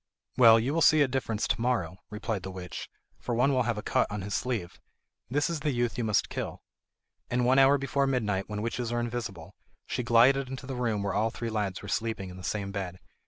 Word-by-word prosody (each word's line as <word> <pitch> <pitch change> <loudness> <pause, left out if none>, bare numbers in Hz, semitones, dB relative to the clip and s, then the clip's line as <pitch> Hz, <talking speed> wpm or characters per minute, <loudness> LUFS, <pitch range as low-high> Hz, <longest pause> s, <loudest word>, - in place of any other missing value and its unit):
"Well, 115 -2 +8
you 125 +6 -1
will 165 - +1
see 155 0 +6
a - - +1
difference 125 -5 -1
to - - -1
morrow," 110 -9 0
replied 105 -1 -3
the 95 - -6
witch, 90 -2 -7 0.3
"for 120 - -3
one 135 +4 +3
will 130 - +3
have 115 - 0
a 105 - -4
cut - - +1
on 105 -2 -4
his 100 +1 -4
sleeve. 105 -9 -2 0.5
That 145 +3 +1
is 170 -2 -2
the 150 0 -1
youth 120 -3 0
you 120 - -2
must 105 -2 +2
kill." - - -5 0.7
And 125 0 +1
one 130 +2 +5
hour 135 +1 +6
before 140 0 0
midnight, 105 -7 -1
when 105 0 -3
witches 115 +1 -2
are 120 - 0
invisible, 115 -8 -5 0.3
she - - -2
glided 125 +3 +4
into 135 0 -6
the 135 - -5
room 115 -5 -1
where 100 -1 -1
all 110 +2 +1
three 115 0 -5
lads 105 -4 -2
were - - -7
sleeping 105 -2 -2
in 90 - -10
the 90 - -10
same 100 +1 -2
bed. 95 -3 -4
115 Hz, 230 wpm, -29 LUFS, 100-130 Hz, 0.7 s, Well